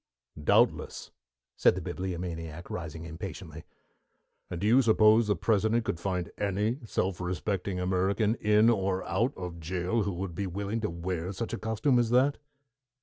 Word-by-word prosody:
"Doubtless," -, -, +2 dB, 0.4 s
said -, -, +4 dB
the -, -, -4 dB
Bibliomaniac, 85 Hz, -3 st, -5 dB
rising 80 Hz, -1 st, -5 dB
impatiently. 85 Hz, 0 st, -8 dB, 0.8 s
"And 90 Hz, -, -4 dB
do 100 Hz, -, -2 dB
you 120 Hz, +5 st, +6 dB
suppose 110 Hz, -1 st, +5 dB
the 105 Hz, -, +2 dB
President 110 Hz, +5 st, +1 dB
could 85 Hz, -, -2 dB
find 90 Hz, -2 st, -2 dB
any 105 Hz, +5 st, 0 dB
self 95 Hz, -4 st, -1 dB
respecting 90 Hz, +1 st, -2 dB
American 95 Hz, +4 st, +1 dB
in 105 Hz, +2 st, +4 dB
or 95 Hz, -3 st, 0 dB
out 120 Hz, +3 st, 0 dB
of 90 Hz, -2 st, -6 dB
jail 90 Hz, +6 st, -1 dB
who 100 Hz, -1 st, -1 dB
would 90 Hz, 0 st, -4 dB
be 100 Hz, +3 st, -3 dB
willing 100 Hz, +5 st, -3 dB
to 105 Hz, -, -1 dB
wear 85 Hz, +1 st, -3 dB
such 105 Hz, +4 st, -4 dB
a -, -, -3 dB
costume 110 Hz, +4 st, +1 dB
as 120 Hz, -2 st, +1 dB
that?" 130 Hz, +4 st, +3 dB
95 Hz, 155 wpm, -29 LUFS, 90-110 Hz, 0.8 s, you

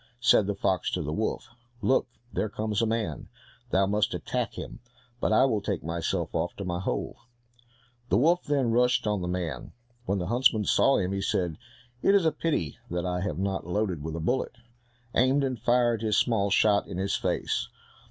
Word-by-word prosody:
Said 115 Hz, -4 st, +4 dB
the 100 Hz, -, -1 dB
fox 95 Hz, -3 st, 0 dB
to -, -, -1 dB
the 75 Hz, -, -3 dB
wolf, 110 Hz, +4 st, -2 dB, 0.3 s
"Look, 130 Hz, -, +3 dB, 0.3 s
there 110 Hz, -, -1 dB
comes 105 Hz, +1 st, -2 dB
a 115 Hz, -, +2 dB
man, 110 Hz, -9 st, -2 dB, 0.4 s
thou 95 Hz, -2 st, +3 dB
must 105 Hz, +1 st, +1 dB
attack -, -, -3 dB
him, -, -, -7 dB, 0.4 s
but -, -, 0 dB
I 110 Hz, -, +5 dB
will 110 Hz, -6 st, +1 dB
take 100 Hz, -3 st, -3 dB
myself 85 Hz, +1 st, -2 dB
off 85 Hz, +1 st, -1 dB
to 100 Hz, -, -6 dB
my 90 Hz, -1 st, -2 dB
hole." 95 Hz, -, -3 dB, 0.9 s
The -, -, +3 dB
wolf 170 Hz, +7 st, +3 dB
then 140 Hz, -5 st, +1 dB
rushed 125 Hz, +1 st, +3 dB
on 105 Hz, -2 st, 0 dB
the 90 Hz, -, -3 dB
man. 85 Hz, -7 st, -4 dB, 0.3 s
When 100 Hz, -, +1 dB
the 90 Hz, -, -2 dB
huntsman 115 Hz, 0 st, +3 dB
saw 135 Hz, -, +4 dB
him 95 Hz, 0 st, -1 dB
he 100 Hz, 0 st, -2 dB
said, 90 Hz, -4 st, -1 dB, 0.4 s
"It 200 Hz, -, +4 dB
is 195 Hz, -4 st, +4 dB
a 160 Hz, -, +4 dB
pity 150 Hz, -, -2 dB
that 85 Hz, +1 st, -2 dB
I 90 Hz, 0 st, -1 dB
have 85 Hz, -6 st, -2 dB
not 95 Hz, -2 st, -2 dB
loaded 95 Hz, -3 st, -1 dB
with 80 Hz, +1 st, -5 dB
a -, -, -3 dB
bullet," 125 Hz, +12 st, -1 dB, 0.6 s
aimed, 130 Hz, +3 st, +3 dB
and 130 Hz, -3 st, -2 dB
fired 120 Hz, -2 st, +2 dB
his 110 Hz, -2 st, +1 dB
small 105 Hz, -4 st, +2 dB
shot 100 Hz, +1 st, +3 dB
in -, -, -6 dB
his 95 Hz, +1 st, 0 dB
face. -, -, -1 dB
105 Hz, 195 wpm, -27 LUFS, 90-120 Hz, 0.9 s, I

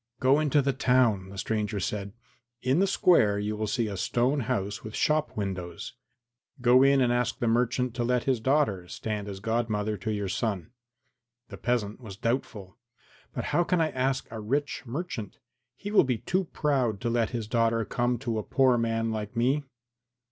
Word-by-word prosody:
"Go 135 Hz, +3 st, +4 dB
into 150 Hz, -2 st, +2 dB
the 140 Hz, 0 st, +1 dB
town," 125 Hz, -8 st, +2 dB
the 100 Hz, -, -10 dB
stranger 105 Hz, +1 st, -1 dB
said; 100 Hz, +1 st, -3 dB, 0.5 s
"in 130 Hz, +6 st, +2 dB
the 195 Hz, -, +3 dB
square 145 Hz, -, +4 dB
you 105 Hz, +1 st, -2 dB
will 110 Hz, 0 st, -2 dB
see 115 Hz, +2 st, 0 dB
a 100 Hz, -, -4 dB
stone 125 Hz, +9 st, +1 dB
house 105 Hz, -4 st, -2 dB
with 110 Hz, 0 st, -7 dB
shop 155 Hz, -3 st, +1 dB
windows; 90 Hz, -4 st, -4 dB, 0.7 s
go 125 Hz, +1 st, +5 dB
in 135 Hz, 0 st, +5 dB
and 120 Hz, -1 st, +3 dB
ask 120 Hz, 0 st, 0 dB
the 120 Hz, -, -1 dB
merchant 125 Hz, +1 st, +1 dB
to 120 Hz, -, -2 dB
let 125 Hz, 0 st, +1 dB
his 130 Hz, -3 st, +1 dB
daughter 110 Hz, -8 st, +1 dB
stand 105 Hz, +2 st, -4 dB
as 100 Hz, -1 st, -6 dB
godmother 110 Hz, -1 st, -1 dB
to 110 Hz, +4 st, -3 dB
your 105 Hz, -2 st, -2 dB
son." 100 Hz, 0 st, -2 dB, 0.8 s
The -, -, -8 dB
peasant 115 Hz, -2 st, -1 dB
was 100 Hz, -5 st, -9 dB
doubtful. 110 Hz, -5 st, -3 dB, 0.6 s
"But -, -, -2 dB
how 175 Hz, -, +4 dB
can 180 Hz, 0 st, +1 dB
I 160 Hz, -1 st, +1 dB
ask 130 Hz, +1 st, 0 dB
a 110 Hz, -, -5 dB
rich 140 Hz, +7 st, -1 dB
merchant? 120 Hz, -, -5 dB, 0.4 s
He 205 Hz, -, -6 dB
will 210 Hz, -, +6 dB
be 125 Hz, -3 st, 0 dB
too 185 Hz, -, -1 dB
proud 130 Hz, -10 st, 0 dB
to 120 Hz, -, -1 dB
let 115 Hz, -2 st, +1 dB
his 115 Hz, -3 st, -4 dB
daughter 115 Hz, -1 st, +1 dB
come 120 Hz, +2 st, 0 dB
to 115 Hz, -5 st, -1 dB
a -, -, -4 dB
poor 130 Hz, -1 st, +3 dB
man 115 Hz, 0 st, 0 dB
like 105 Hz, 0 st, -4 dB
me." 135 Hz, +5 st, +1 dB
115 Hz, 185 wpm, -28 LUFS, 105-130 Hz, 0.8 s, will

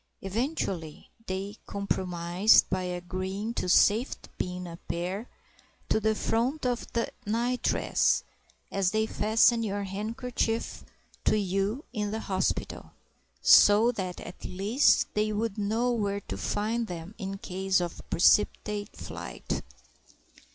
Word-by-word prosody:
Eventually 195 Hz, -, -3 dB, 0.2 s
they 195 Hz, +3 st, -4 dB
compromised 185 Hz, 0 st, +3 dB
by 185 Hz, -, +1 dB
agreeing 185 Hz, +4 st, -4 dB
to 185 Hz, -, -2 dB
safety 215 Hz, +7 st, +3 dB
pin 180 Hz, 0 st, -3 dB
a 170 Hz, -1 st, -8 dB
pair 180 Hz, +7 st, -4 dB, 0.6 s
to -, -, +3 dB
the 220 Hz, 0 st, +1 dB
front 250 Hz, +8 st, 0 dB
of 245 Hz, -1 st, -2 dB
the 230 Hz, 0 st, -1 dB, 0.2 s
nightdress 240 Hz, +3 st, +1 dB, 0.5 s
(as 195 Hz, -2 st, +2 dB
they 220 Hz, +2 st, +1 dB
fasten 225 Hz, +2 st, +3 dB
your 205 Hz, -2 st, -2 dB
handkerchief 225 Hz, +3 st, -2 dB, 0.4 s
to -, -, +4 dB
you 200 Hz, -, -1 dB
in 210 Hz, -3 st, -1 dB
the 220 Hz, +2 st, -3 dB
hospital), 190 Hz, -1 st, -2 dB, 0.5 s
so 210 Hz, +4 st, +7 dB
that 185 Hz, -6 st, -4 dB
at 175 Hz, -, -10 dB
least 205 Hz, +9 st, +3 dB
they 215 Hz, 0 st, +1 dB
would 215 Hz, 0 st, -2 dB
know 225 Hz, +4 st, +1 dB
where 205 Hz, -3 st, -1 dB
to -, -, -6 dB
find 225 Hz, +3 st, -1 dB
them 175 Hz, +2 st, -7 dB
in 195 Hz, -1 st, -4 dB
case 190 Hz, 0 st, 0 dB
of 175 Hz, -1 st, -4 dB
precipitate 205 Hz, +3 st, +2 dB
flight. -, -, -5 dB
205 Hz, 125 wpm, -28 LUFS, 185-225 Hz, 0.6 s, so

